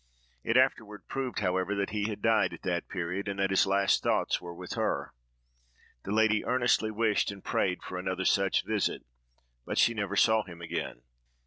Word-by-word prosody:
It 115 Hz, -, +2 dB
afterward 110 Hz, -5 st, +1 dB
proved, 130 Hz, -5 st, -3 dB
however, 95 Hz, +1 st, 0 dB
that 100 Hz, 0 st, -2 dB
he 105 Hz, 0 st, -1 dB
had 105 Hz, -1 st, -6 dB
died 110 Hz, -2 st, +3 dB
at -, -, -11 dB
that 90 Hz, -2 st, -2 dB
period, 90 Hz, +2 st, -3 dB
and 100 Hz, -1 st, -3 dB
that 95 Hz, 0 st, +1 dB
his 95 Hz, -, +3 dB
last 100 Hz, 0 st, +2 dB
thoughts -, -, +1 dB
were 85 Hz, -1 st, -8 dB
with 90 Hz, +1 st, -7 dB
her. -, -, -2 dB, 0.9 s
This 100 Hz, -, -5 dB
lady 110 Hz, 0 st, +3 dB
earnestly 120 Hz, -3 st, +2 dB
wished 110 Hz, -1 st, +1 dB
and 100 Hz, -1 st, -8 dB
prayed 90 Hz, -1 st, -1 dB
for 90 Hz, -, -5 dB
another 95 Hz, 0 st, -2 dB
such 95 Hz, -1 st, +2 dB
visit, 105 Hz, -1 st, -1 dB, 0.6 s
but -, -, -4 dB
she 120 Hz, -, +4 dB
never 100 Hz, -3 st, -3 dB
saw 110 Hz, +2 st, +4 dB
him 90 Hz, -4 st, -11 dB
again. 85 Hz, -7 st, -5 dB
100 Hz, 185 wpm, -29 LUFS, 95-110 Hz, 0.9 s, she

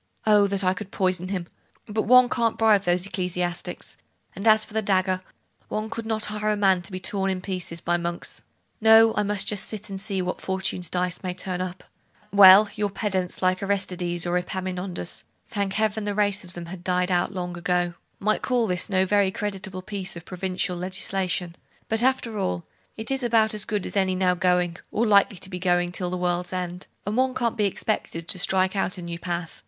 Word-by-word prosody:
Oh, 210 Hz, -2 st, +5 dB
that 200 Hz, 0 st, -1 dB
I 185 Hz, 0 st, +3 dB
could 190 Hz, +1 st, -7 dB
poison 185 Hz, -2 st, 0 dB
him! 185 Hz, -2 st, -3 dB, 0.4 s
But 215 Hz, 0 st, -2 dB
one 250 Hz, +1 st, +7 dB
can't 230 Hz, -2 st, 0 dB
bribe 215 Hz, -3 st, +4 dB
those 175 Hz, +1 st, +2 dB
ecclesiastics; 180 Hz, -2 st, -3 dB, 0.4 s
and 200 Hz, +4 st, -2 dB
as 215 Hz, 0 st, +6 dB
for -, -, -15 dB
the 220 Hz, -, +1 dB
dagger, 185 Hz, -2 st, +1 dB, 0.5 s
one 215 Hz, +1 st, -3 dB
could 230 Hz, -1 st, -5 dB
not 220 Hz, -1 st, 0 dB
hire 210 Hz, 0 st, -1 dB
a 210 Hz, -, +2 dB
man 190 Hz, -3 st, +3 dB
to 175 Hz, -, -10 dB
be 185 Hz, -, -4 dB
torn 195 Hz, +1 st, -1 dB
in 190 Hz, -1 st, -1 dB
pieces 180 Hz, -3 st, -4 dB
by 175 Hz, 0 st, +1 dB
monks. 170 Hz, 0 st, -4 dB, 0.4 s
No; 225 Hz, 0 st, +7 dB
I -, -, +1 dB
must 205 Hz, -1 st, 0 dB
just 205 Hz, -2 st, +1 dB
sit 215 Hz, -2 st, -3 dB
still, 200 Hz, -, -7 dB
and 190 Hz, -, -2 dB
see 195 Hz, -1 st, -2 dB
what 180 Hz, -, -4 dB
Fortune's 190 Hz, -2 st, -1 dB
dice 180 Hz, 0 st, -1 dB
may 180 Hz, -2 st, -4 dB
turn 185 Hz, -1 st, -4 dB
up. 185 Hz, 0 st, -5 dB, 0.5 s
Well, 200 Hz, +1 st, +9 dB
your 210 Hz, -1 st, -1 dB
pedants 190 Hz, -3 st, -2 dB
like 185 Hz, 0 st, +2 dB
Aristides 180 Hz, -3 st, -1 dB
or 175 Hz, +1 st, +1 dB
Epaminondas 185 Hz, -1 st, -3 dB, 0.2 s
thank 200 Hz, -3 st, -2 dB
Heaven, 215 Hz, 0 st, 0 dB
the 205 Hz, -1 st, -2 dB
race 205 Hz, -1 st, +1 dB
of 180 Hz, -1 st, -10 dB
them 175 Hz, -2 st, -7 dB
has 175 Hz, +2 st, -8 dB
died 180 Hz, 0 st, 0 dB
out 175 Hz, +1 st, +1 dB
long 180 Hz, -2 st, -4 dB
ago! 175 Hz, 0 st, 0 dB, 0.3 s
might 215 Hz, +2 st, +1 dB
call 245 Hz, -2 st, +1 dB
this 180 Hz, -2 st, -1 dB
no 190 Hz, -1 st, +3 dB
very 200 Hz, 0 st, +3 dB
creditable 190 Hz, -2 st, -5 dB
piece 195 Hz, -3 st, -4 dB
of 170 Hz, 0 st, -9 dB
provincial 185 Hz, 0 st, -2 dB
legislation; 185 Hz, -1 st, -2 dB, 0.3 s
but 225 Hz, 0 st, 0 dB
after 245 Hz, -4 st, +1 dB
all, 90 Hz, -, -2 dB, 0.3 s
it 220 Hz, +3 st, -4 dB
is 270 Hz, 0 st, 0 dB
about 225 Hz, -3 st, +3 dB
as 210 Hz, -2 st, -1 dB
good 210 Hz, -3 st, -2 dB
as -, -, -5 dB
any 190 Hz, -2 st, +2 dB
now 185 Hz, -1 st, +2 dB
going, 180 Hz, -1 st, +1 dB
or 230 Hz, -, +1 dB
likely 200 Hz, -2 st, +4 dB
to 185 Hz, -, -7 dB
be 180 Hz, -, -4 dB
going 175 Hz, -1 st, +1 dB
till 180 Hz, 0 st, -3 dB
the 180 Hz, -, -3 dB
world's 180 Hz, 0 st, -1 dB
end; 180 Hz, 0 st, -4 dB, 0.2 s
and 205 Hz, +2 st, -2 dB
one 260 Hz, 0 st, +2 dB
can't 235 Hz, -2 st, 0 dB
be 210 Hz, -3 st, +1 dB
expected 185 Hz, -4 st, -2 dB
to 185 Hz, -, +2 dB
strike 190 Hz, +1 st, +2 dB
out 185 Hz, -2 st, -1 dB
a 180 Hz, -, -7 dB
new 170 Hz, 0 st, -5 dB
path. 175 Hz, -1 st, -4 dB
190 Hz, 210 wpm, -25 LUFS, 180-210 Hz, 0.5 s, Well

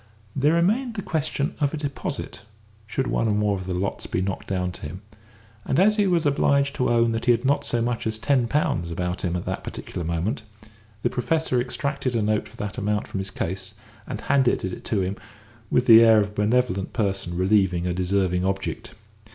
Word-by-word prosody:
There 145 Hz, +4 st, +3 dB
remained 225 Hz, +8 st, +1 dB
the 200 Hz, -, -4 dB
question 155 Hz, -5 st, -1 dB
of 145 Hz, 0 st, +1 dB
a -, -, -4 dB
deposit, 145 Hz, -8 st, -4 dB, 0.5 s
should 130 Hz, +4 st, -1 dB
one 115 Hz, -, 0 dB
or 105 Hz, -, +2 dB
more 105 Hz, -1 st, +1 dB
of 95 Hz, -1 st, -6 dB
the 90 Hz, -, -2 dB
lots 95 Hz, +2 st, -3 dB
be -, -, -1 dB
knocked 95 Hz, 0 st, -3 dB
down 90 Hz, -1 st, -1 dB
to 90 Hz, -, -11 dB
him; 90 Hz, +7 st, -7 dB, 0.6 s
and, 135 Hz, -, -1 dB
as 210 Hz, +3 st, +4 dB
he 205 Hz, -2 st, +3 dB
was 170 Hz, -3 st, +2 dB
obliged 140 Hz, -1 st, +2 dB
to 125 Hz, -, +1 dB
own 115 Hz, -1 st, +3 dB
that 115 Hz, 0 st, -2 dB
he 125 Hz, -, +5 dB
had 120 Hz, +2 st, +1 dB
not 140 Hz, +2 st, +2 dB
so 120 Hz, -1 st, 0 dB
much 120 Hz, -1 st, -1 dB
as 110 Hz, 0 st, -1 dB
ten 120 Hz, +2 st, +2 dB
pounds 115 Hz, -, 0 dB
about 90 Hz, +2 st, -3 dB
him 90 Hz, -2 st, -1 dB
at 90 Hz, -, -3 dB
that -, -, -3 dB
particular 85 Hz, -, -6 dB
moment, 85 Hz, -, -1 dB, 0.6 s
the -, -, +1 dB
Professor 140 Hz, -1 st, 0 dB
extracted 135 Hz, 0 st, -2 dB
a 110 Hz, -, +1 dB
note 105 Hz, 0 st, 0 dB
for -, -, -17 dB
that 105 Hz, 0 st, -4 dB
amount 105 Hz, +1 st, 0 dB
from 95 Hz, -, -4 dB
his 95 Hz, 0 st, -3 dB
case, 95 Hz, +1 st, -4 dB, 0.3 s
and -, -, -5 dB
handed 135 Hz, -3 st, +2 dB
it 95 Hz, -, -5 dB
to 105 Hz, -4 st, 0 dB
him 95 Hz, +2 st, -2 dB, 0.5 s
with 125 Hz, -, +2 dB
the 115 Hz, -1 st, +9 dB
air 110 Hz, -1 st, +7 dB
of 100 Hz, -1 st, +1 dB
a -, -, -14 dB
benevolent 105 Hz, -2 st, 0 dB
person 95 Hz, -5 st, -1 dB
relieving 95 Hz, -2 st, +2 dB
a 90 Hz, -, 0 dB
deserving 90 Hz, 0 st, +1 dB
object. 95 Hz, +4 st, -3 dB
110 Hz, 210 wpm, -24 LUFS, 95-140 Hz, 0.6 s, the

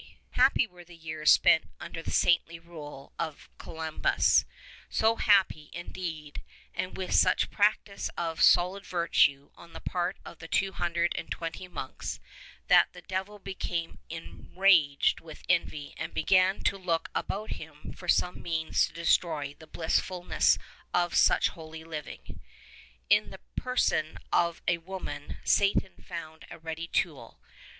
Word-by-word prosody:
Happy 260 Hz, 0 st, +4 dB
were 180 Hz, -5 st, -15 dB
the 175 Hz, 0 st, -15 dB
years 155 Hz, -2 st, -1 dB
spent 160 Hz, -, +6 dB
under 170 Hz, -1 st, -6 dB
the -, -, -5 dB
saintly 170 Hz, -1 st, +2 dB
rule 155 Hz, -5 st, -11 dB
of 160 Hz, -2 st, -5 dB
Columbanus, 160 Hz, -1 st, +1 dB, 0.4 s
so 225 Hz, +1 st, +2 dB
happy, 190 Hz, -7 st, +3 dB
indeed, 165 Hz, -3 st, -6 dB, 0.3 s
and 185 Hz, -, -4 dB
with 185 Hz, -1 st, -3 dB
such -, -, +4 dB
practise 205 Hz, -1 st, +1 dB
of 165 Hz, -2 st, -2 dB
solid 180 Hz, +3 st, +5 dB
virtue 150 Hz, -6 st, +2 dB
on 170 Hz, -1 st, -15 dB
the -, -, -7 dB
part 180 Hz, +2 st, -2 dB
of 170 Hz, -, -11 dB
the 165 Hz, -, -9 dB
two 195 Hz, +3 st, +1 dB
hundred 170 Hz, -1 st, 0 dB
and -, -, -5 dB
twenty 165 Hz, +2 st, -5 dB
monks, 135 Hz, -7 st, -6 dB, 0.5 s
that -, -, +6 dB
the 180 Hz, -1 st, -12 dB
devil 190 Hz, +3 st, -4 dB
became 180 Hz, -4 st, -4 dB
enraged 165 Hz, -2 st, +2 dB
with 160 Hz, -2 st, -12 dB
envy 155 Hz, -5 st, 0 dB
and 160 Hz, +1 st, -5 dB
began 185 Hz, +3 st, +3 dB
to 195 Hz, -, +1 dB
look 170 Hz, -3 st, -1 dB
about 210 Hz, +3 st, -3 dB
him 150 Hz, -2 st, -8 dB
for 180 Hz, -, -11 dB
some 180 Hz, +1 st, +2 dB
means 160 Hz, -2 st, +1 dB
to -, -, -16 dB
destroy 160 Hz, -3 st, +1 dB
the 160 Hz, -, -13 dB
blissful 175 Hz, +3 st, -1 dB
ness -, -, +3 dB, 0.4 s
of 175 Hz, -1 st, +2 dB
such -, -, +4 dB
holy 160 Hz, -1 st, -10 dB
living. 155 Hz, -2 st, -8 dB, 0.7 s
In -, -, +5 dB
the -, -, -11 dB
person -, -, 0 dB, 0.2 s
of 170 Hz, -1 st, +2 dB
a 170 Hz, -1 st, +2 dB
woman 165 Hz, -5 st, -7 dB
Satan 200 Hz, -1 st, +2 dB
found 160 Hz, -2 st, -8 dB
a -, -, -9 dB
ready 165 Hz, 0 st, -5 dB
tool. -, -, -2 dB
170 Hz, 145 wpm, -29 LUFS, 160-185 Hz, 0.7 s, spent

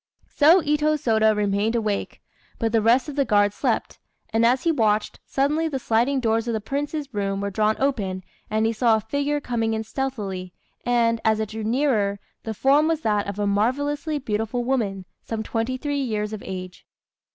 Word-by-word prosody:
So 325 Hz, +5 st, +6 dB
Itô 300 Hz, 0 st, +1 dB
Sôda 220 Hz, -5 st, +3 dB
remained 205 Hz, +2 st, +1 dB
awake, 215 Hz, -3 st, -2 dB, 0.3 s
but 225 Hz, -2 st, -1 dB
the 225 Hz, -1 st, +3 dB
rest 235 Hz, +6 st, +3 dB
of 295 Hz, -, -6 dB
the 280 Hz, -, +3 dB
guard 205 Hz, -4 st, +3 dB
slept; -, -, -1 dB, 0.3 s
and 225 Hz, +1 st, +3 dB
as 250 Hz, +3 st, +3 dB
he 335 Hz, -, +3 dB
watched, 215 Hz, -7 st, +1 dB
suddenly 300 Hz, +4 st, +1 dB
the 290 Hz, -4 st, -2 dB
sliding 245 Hz, +3 st, +1 dB
doors 225 Hz, -1 st, 0 dB
of 230 Hz, -, 0 dB
the -, -, -1 dB
Prince's 285 Hz, +4 st, -4 dB
room 195 Hz, -1 st, -1 dB
were 200 Hz, 0 st, -2 dB
drawn 215 Hz, +2 st, +2 dB
open, 200 Hz, -9 st, -1 dB, 0.3 s
and 220 Hz, +1 st, +1 dB
he 225 Hz, -, +1 dB
saw 230 Hz, 0 st, +3 dB
a -, -, +1 dB
figure 285 Hz, +6 st, -1 dB
coming 225 Hz, -5 st, -1 dB
in 220 Hz, -, -2 dB
stealthily, 210 Hz, -7 st, -4 dB, 0.3 s
and, 230 Hz, -2 st, +2 dB
as 220 Hz, -1 st, +2 dB
it 220 Hz, -1 st, -2 dB
drew 220 Hz, 0 st, -5 dB
nearer, 220 Hz, -4 st, +1 dB, 0.3 s
the 220 Hz, -1 st, -4 dB
form 280 Hz, +7 st, +4 dB
was 325 Hz, -1 st, 0 dB
that 210 Hz, -5 st, 0 dB
of 200 Hz, 0 st, -5 dB
a 205 Hz, -, 0 dB
marvellously 285 Hz, +9 st, 0 dB
beautiful 225 Hz, -1 st, -2 dB
woman 215 Hz, -7 st, -1 dB, 0.2 s
some 220 Hz, -1 st, -4 dB
twenty 230 Hz, +3 st, -2 dB
three 285 Hz, +1 st, -2 dB
years 215 Hz, -4 st, -2 dB
of 215 Hz, -, -5 dB
age. 185 Hz, -1 st, -7 dB
225 Hz, 190 wpm, -24 LUFS, 210-275 Hz, 0.3 s, So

